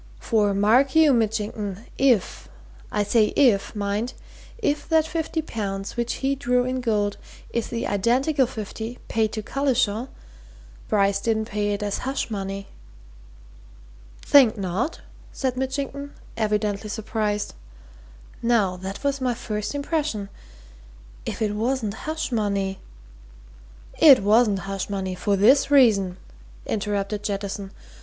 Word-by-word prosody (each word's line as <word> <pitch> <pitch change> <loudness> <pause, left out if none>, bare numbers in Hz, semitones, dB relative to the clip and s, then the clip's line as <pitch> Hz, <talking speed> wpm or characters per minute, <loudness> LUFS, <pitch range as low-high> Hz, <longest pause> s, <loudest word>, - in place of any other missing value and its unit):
For 210 -3 +1
mark 245 +8 +3
you, 315 -3 +6
Mitchington, 215 -2 -1
if 250 -8 +1 0.4
I 210 - +1
say 215 +2 +3
if, 235 -8 +3
mind! 205 +4 -2 0.4
if 300 -10 -1
that 320 -1 +4
fifty 320 -1 -2
pounds 195 -7 -4
which 240 0 -1
he 275 - +2
drew 250 -2 +1
in 255 0 -2
gold 210 -4 0 0.3
is 235 - -1
the 235 -1 -3
identical 255 +7 +2
fifty 225 +1 -6
paid 220 -1 +1
to 215 - -4
Collishaw, 255 -3 0 0.8
Bryce 200 -2 +2
didn't 220 0 0
pay 210 -2 -1
it 205 - -3
as 205 -1 -2
hush 265 -2 -3
money!" 195 -1 -4 1.6
"Think 260 -7 +6
not?" 200 - -2 0.3
said 260 -2 -2
Mitchington, 275 +2 -4 0.2
evidently 210 -1 -1
surprised. 215 -1 -2 0.9
"Now, 220 -6 +2
that 190 +5 -7
was 280 -1 0
my 250 -2 0
first 210 +2 -4
impression. 285 -8 -2 1.0
If - - -2
it 210 -1 0
wasn't 225 -1 -1 0.2
hush 315 -3 -3
money 200 -4 -1 0.6
" - - -22
"It 255 - +6
wasn't 210 -1 +4
hush 195 0 -4
money, 190 -2 -3
for 200 +3 0
this 250 +9 +5
reason," 210 -10 +4 0.5
interrupted 205 -1 -2
Jettison. 200 -1 -3
220 Hz, 125 wpm, -24 LUFS, 200-255 Hz, 1.6 s, you